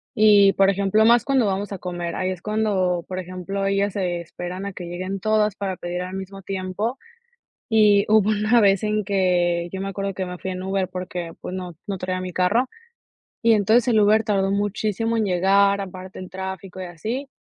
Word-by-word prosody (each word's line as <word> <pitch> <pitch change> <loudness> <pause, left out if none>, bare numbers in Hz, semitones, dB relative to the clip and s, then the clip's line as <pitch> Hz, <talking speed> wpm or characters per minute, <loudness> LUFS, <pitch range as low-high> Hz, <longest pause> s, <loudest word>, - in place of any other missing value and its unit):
Y, 205 -2 +6
por 195 0 +4
ejemplo, 200 +2 +2
más 235 -1 +5
cuando 270 -4 +2
vamos 200 +1 -2
a 200 - -4
comer. 175 -1 -4
Ahí 185 0 -1
es 180 -2 -6
cuando, 195 -5 0
por 185 0 -4
ejemplo, 185 +2 -4
ellas 195 0 +1
se 180 -3 -2
esperan 180 +3 -6
a 200 - -5
que 180 - -7
lleguen 185 +3 -4
todas 215 0 +1
para 190 -2 -3
pedir 175 +1 -4
al 185 +1 -5
mismo 195 0 -7
tiempo. 195 +6 -3 0.7
Y 210 -2 +5
hubo 215 -1 +4
una 215 +3 +3
vez 195 -2 +4
en 215 -1 0
que 175 -3 +1
yo 190 - -4
me 195 - -3
acuerdo 195 0 -3
que 185 0 -3
me 180 0 -6
fui 190 - -5
en 185 0 -5
Uber 190 -1 -1
porque, 180 -2 -5
pues, 180 - -6
no, 180 -3 -6
no 195 -2 -3
traía 185 0 -3
mi 185 0 -5
carro 210 +9 +2 0.7
y 230 -1 +5
entonces 220 +4 +3
el 220 -3 +4
Uber 215 +2 +4
tardó 195 -3 +1
muchísimo 210 +3 -1
en 220 - +1
llegar, 200 +2 +3
aparte 185 0 -8
el 185 0 -8
tráfico 190 0 -7
y 185 - -4
así. 220 - -5
195 Hz, 205 wpm, -23 LUFS, 185-210 Hz, 0.7 s, Y